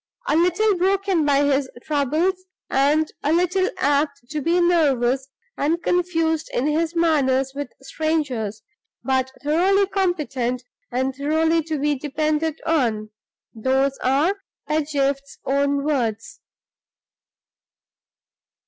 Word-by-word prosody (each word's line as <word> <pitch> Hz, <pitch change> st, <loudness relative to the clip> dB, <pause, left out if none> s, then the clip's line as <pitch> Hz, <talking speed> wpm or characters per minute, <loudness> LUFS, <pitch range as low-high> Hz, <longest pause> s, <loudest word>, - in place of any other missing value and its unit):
A -, -, +2 dB
little 360 Hz, +5 st, +3 dB
broken 385 Hz, -2 st, +2 dB
by 285 Hz, -1 st, +3 dB
his 280 Hz, -1 st, +1 dB
troubles, 315 Hz, +6 st, 0 dB, 0.3 s
and 295 Hz, +3 st, +2 dB
a 295 Hz, -, 0 dB
little 360 Hz, +3 st, +2 dB
apt 285 Hz, 0 st, +1 dB
to 305 Hz, -1 st, -2 dB
be 335 Hz, +5 st, +2 dB
nervous 275 Hz, -7 st, +2 dB, 0.3 s
and 330 Hz, +4 st, 0 dB
confused 330 Hz, -3 st, 0 dB
in 245 Hz, -, +1 dB
his 320 Hz, +3 st, 0 dB
manner 285 Hz, -6 st, +2 dB
with 285 Hz, -2 st, -5 dB
strangers; 270 Hz, -10 st, -2 dB, 0.4 s
but 260 Hz, -1 st, 0 dB
thoroughly 370 Hz, +7 st, +3 dB
competent 300 Hz, -11 st, -1 dB, 0.3 s
and 260 Hz, +2 st, -1 dB
thoroughly 320 Hz, +4 st, +1 dB
to 315 Hz, -1 st, -2 dB
be 295 Hz, +1 st, +1 dB
depended 305 Hz, +2 st, -1 dB
on 230 Hz, -10 st, 0 dB, 0.4 s
those 265 Hz, +4 st, +1 dB
are 300 Hz, +10 st, +2 dB, 0.3 s
Pedgift's 280 Hz, -2 st, -1 dB
own 280 Hz, +1 st, +1 dB
words." 230 Hz, -7 st, -2 dB
300 Hz, 110 wpm, -22 LUFS, 270-330 Hz, 0.4 s, little